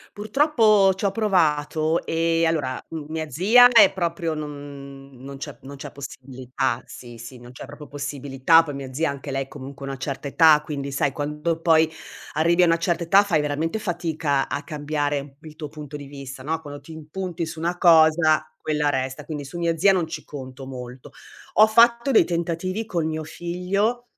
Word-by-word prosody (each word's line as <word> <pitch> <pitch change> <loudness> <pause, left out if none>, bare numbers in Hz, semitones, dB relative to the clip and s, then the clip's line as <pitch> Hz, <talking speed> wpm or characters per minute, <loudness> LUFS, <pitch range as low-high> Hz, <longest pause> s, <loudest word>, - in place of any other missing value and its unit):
Purtroppo 215 -4 +3
ci 190 - -6
ho 200 - +3
provato 160 -6 +1
e 165 0 +1
allora, 145 -6 -1
uhm, 155 -3 -7
mia 155 0 -4
zia 220 - +6
è 220 -5 +6
proprio 170 -3 -2
non 140 -2 -9
non 135 +2 -10
c'è 145 +1 -8
non 140 +1 -10
c'è 145 +1 -8
possibilità, 130 -2 -4
sì, 120 -2 -11
sì, 120 +2 -10
non 120 +1 -13
c'è 125 - -10
proprio 150 - -11
possibilità, 140 +2 +2
poi 150 -3 -7
mia 135 -1 -7
zia 155 +3 0
anche 140 0 -7
lei 135 0 -3
comunque 140 -1 -9
ha - - -5
una 135 - -6
certa 140 +1 -5
età. 155 0 +6
Quindi 140 -2 -5
sai 140 0 0
quando 150 +3 -3
poi 160 -1 +4 0.4
arrivi 170 +3 +3
a - - +6
una 165 0 +3
certa 170 0 -1
età 195 +4 +5
fai 180 -7 +1
veramente 150 +7 -2
fatica 165 -7 -1
a 140 +2 -3
cambiare 145 -2 -3
il 155 -2 -13
tuo 155 -2 -6
punto 150 -1 -9
di 145 -1 -9
vista, 135 -1 -9
no, 160 +4 -2
quando 145 -2 -9
ti 165 - -13
impunti 165 +2 -5
su 160 - -8
una 170 +2 -1
cosa 160 -2 +4
quella 150 -1 0
resta, 130 +1 -3
quindi 150 -1 -6
su 145 +5 -8
mia 170 -1 0
zia 195 +4 +5
non 180 -4 0
ci 160 - -7
conto 130 -2 -9
molto. 125 -1 -9 0.4
Ho 215 - +7
fatto 235 +3 +4
dei 240 - +5
tentativi 175 +4 -2
con 170 -6 -2
mio 160 0 -3
figlio 185 +9 -2
155 Hz, 190 wpm, -23 LUFS, 140-170 Hz, 0.4 s, Ho